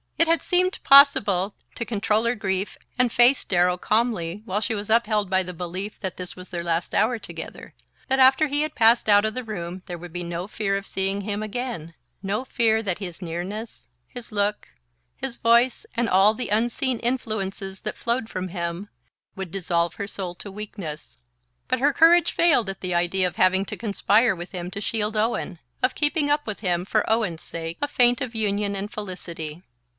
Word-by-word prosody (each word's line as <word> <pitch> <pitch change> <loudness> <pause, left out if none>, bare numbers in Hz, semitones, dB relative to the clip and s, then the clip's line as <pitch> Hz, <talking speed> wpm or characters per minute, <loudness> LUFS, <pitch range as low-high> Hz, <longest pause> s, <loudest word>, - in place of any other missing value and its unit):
It 335 - +4
had 330 0 +3
seemed 365 +1 +2
possible 210 -9 +6 0.2
to 235 - -3
control 215 0 0
her 235 +1 +2
grief 195 -2 -2 0.2
and 250 -2 +3
face 245 +3 +5
Darrow 180 -1 +2
calmly 210 -4 0
while 205 -1 -1
she 225 +1 -1
was 205 0 -5
upheld 215 -3 +2
by 190 0 +3
the 180 -1 -5
belief 180 +4 -6
that 190 -3 -5
this 180 -1 -7
was 180 0 -11
their 170 -1 -4
last 170 0 -1
hour 240 +2 +3
together, - - -8 0.3
that 265 0 +1
after 265 +4 +6
he 290 +1 0
had 305 0 -2
passed 230 -1 +4
out 205 0 +6
of 220 - -1
the 255 - -4
room 185 -4 -6
there 175 - -5
would 175 -1 -10
be 175 0 -3
no 170 +2 -4
fear 205 -2 -1
of 200 - -6
seeing 195 +1 -1
him 205 +1 -3
again, 215 -7 -5 0.3
no 205 +6 -2
fear 225 -4 +2
that 190 -4 -2
his 180 -4 -7
nearness, 185 +6 -6 0.2
his 245 -2 -10
look, 205 0 -1 0.5
his 265 -2 -5
voice, 235 - +3
and 235 0 +1
all 195 +2 +5
the 250 - -4
unseen 235 +3 0
influences 200 -6 -3
that 215 - -4
flowed 235 -1 -1
from 185 0 -4
him, 170 +2 -4 0.5
would 190 -3 -6
dissolve 170 -3 -1
her 200 - -4
soul 185 -3 -5
to 200 - -9
weakness. 185 - -7 0.5
But - - 0
her 285 +3 +3
courage 335 +2 +5
failed 325 - +3
at 195 - -6
the 185 -1 -2
idea 175 +2 +2
of 180 - -6
having 190 +1 +3
to - - -6
conspire 215 0 +2
with 175 +1 -8
him 180 -2 -5
to 200 - -6
shield 215 0 -1
Owen, 210 -5 -1 0.2
of 255 - +2
keeping 295 0 +1
up 295 0 +1
with 215 - -4
him, 180 -3 0
for 215 +2 +1
Owen's 210 -8 0
sake, 165 0 -6
a 290 - +1
feint 245 -1 +3
of 250 -3 -3
union 205 -2 0
and 200 +1 -5
felicity. 175 -5 -6
205 Hz, 195 wpm, -24 LUFS, 185-235 Hz, 0.5 s, possible